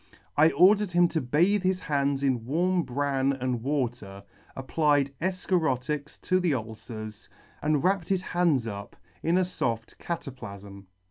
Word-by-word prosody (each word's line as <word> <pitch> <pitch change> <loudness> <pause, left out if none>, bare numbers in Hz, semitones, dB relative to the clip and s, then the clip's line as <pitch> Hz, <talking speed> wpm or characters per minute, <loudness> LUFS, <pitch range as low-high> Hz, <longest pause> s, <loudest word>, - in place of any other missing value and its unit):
I 155 +2 +6
ordered 205 +2 +5
him 175 0 +4
to 160 - -1
bathe 170 +11 +2
his 185 0 +1
hands 140 -2 0
in 130 -4 +1
warm 175 +8 +1
bran 140 -1 0
and 125 -3 -2
w 135 0 +1
T 120 +1 -13
ater, 100 0 -11 0.3
applied 145 +1 +1
efcharotics 150 -6 -1
to 185 - +2
the 175 -6 +1
ulcers, 110 -2 -7 0.3
and 150 -1 +1
wrapped 190 -2 +1
his 190 -2 +1
hands 170 -10 +1
up 100 -2 -7 0.3
in 170 +2 +2
a - - +4
foft 115 -11 -3
cataplafm. 100 - -7
140 Hz, 150 wpm, -27 LUFS, 125-175 Hz, 0.3 s, I